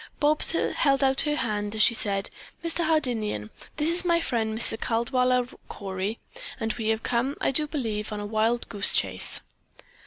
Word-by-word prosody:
Bobs 300 +2 +3
held 280 -4 +2
out 270 0 +3
her 295 -1 0
hand 210 -5 -2
as 215 - +5
she 235 - +6
said: 200 -3 0 0.3
"Mr. 335 +1 +1
Hardinian, 230 - 0 0.3
this 300 0 0
is 340 +2 +3
my 340 -1 +3
friend, 225 -8 -1
Mr. 225 - +2
Caldwaller 250 +2 +1 0.2
Cory, 195 +2 -4 0.4
and 225 -2 -1
we 220 -2 -4
have 220 0 0
come, 250 +4 0
I - - +1
do 300 +3 0
believe, 220 -8 -3
on 210 - -4
a 205 - -4
wild 220 +3 0
goose 205 -1 +1
chase." - - +1
235 Hz, 175 wpm, -26 LUFS, 215-285 Hz, 0.4 s, she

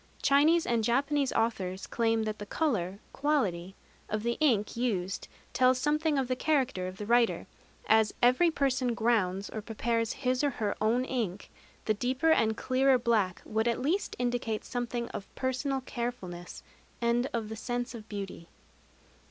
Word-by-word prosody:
Chinese 310 +4 +4
and 235 -2 +1
Japanese 275 +4 +1
authors 195 -5 -1
claim 225 -1 +1
that 215 0 -3
the 205 - -5
color 200 - -1 0.2
(quality) 195 - 0 0.3
of 215 0 -2
the 235 0 0
ink 235 -9 +2
used 200 -6 -2 0.3
tells 255 -1 +4
something 300 +2 +1
of 265 -2 0
the 255 - 0
character 265 -10 0
of 185 0 -7
the 210 - -5
writer. 235 +1 +2 0.4
As 220 -1 +4
every 255 +8 +5
person 265 -5 0
grounds 205 -5 +1
or 215 - -4
prepares 230 +1 -1
his 255 0 0
or 290 - +3
her 220 -6 -2
own 235 +4 +2
ink, 215 -8 -3 0.3
the 215 - +2
deeper 255 +8 +1
and 220 -7 +3
clearer 260 +1 +3
black 220 -7 0
would 220 +2 0
at 235 - +1
least 320 +10 -1
indicate 240 -3 -1
something 240 -1 -3
of 195 - -7
personal 265 +1 -1
carefulness 235 -9 -6 0.4
and 240 +2 +1
of 230 -3 -2
the 220 - -6
sense 245 +2 -3
of 220 -2 -10
beauty. 195 -4 -6
235 Hz, 160 wpm, -30 LUFS, 215-260 Hz, 0.4 s, every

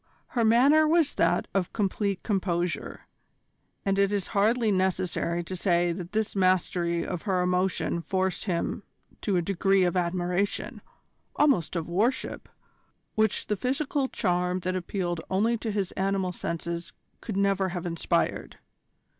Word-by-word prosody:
Her 235 - 0
manner 275 +8 +5
was 325 -2 +3
that - - +1
of 190 -3 -1
complete 200 -2 -1
composure, 180 -4 -1 0.8
and 195 0 +1
it 200 0 +3
is 200 -2 0
hardly 220 +2 +3
necessary 185 -2 0
to 185 +3 -5
say 175 -1 +2
that 175 +1 -6
this 215 -1 -1
mastery 180 -2 +1
of 170 - -4
her 185 -3 0
emotion 180 -1 0
forced 190 +2 -1
him 175 -4 -1 0.4
to 200 -4 +1
a 175 - +1
degree 195 +1 +2
of 175 0 +1
admiration, 180 +2 -1 0.5
almost 275 - +2
of 165 -2 -2
worship, 220 +10 -1 0.6
which 220 -1 +1
the 210 - 0
physical 265 +5 -1
charm 180 -3 0
that 185 +1 -2
appealed 175 -2 -2
only 220 +5 +2
to 225 - -3
his 200 -3 -1
animal 190 -1 0
senses 170 0 -4 0.3
could 210 -4 -4
never 195 -1 +2
have 175 -1 -5
inspired. 170 -1 -1
190 Hz, 140 wpm, -27 LUFS, 175-210 Hz, 0.8 s, manner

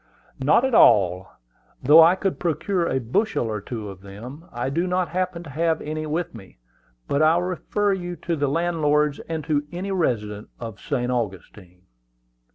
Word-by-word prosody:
"Not 150 - +4
at 265 - -1
all. 95 - +5 0.6
Though 150 +5 +8
I 170 +3 +6
could 190 0 -2
procure 175 +1 0
a 130 - 0
bushel 130 - 0
or 110 -2 -3
two 110 0 -6
of 95 -2 -10
them, 115 - -10
I 120 +3 -3
do 170 +5 0
not 180 -2 0
happen 180 0 -2
to 155 - -10
have 160 +2 0
any 155 +1 -4
with 160 +3 -2
me; 100 -5 -13 0.5
but 140 - +1
I 155 +1 +5
will 175 - +1
refer 195 +3 -1
you 175 -2 -4
to 170 -1 -3
the 145 -2 0
landlords, 150 -2 +1
and 160 -2 -3
to 145 0 0
any 185 +3 -4
resident 105 - -1
of 115 -3 -7
St. 125 -4 -2
Augustine." 95 -5 -5
150 Hz, 175 wpm, -23 LUFS, 115-175 Hz, 0.6 s, Though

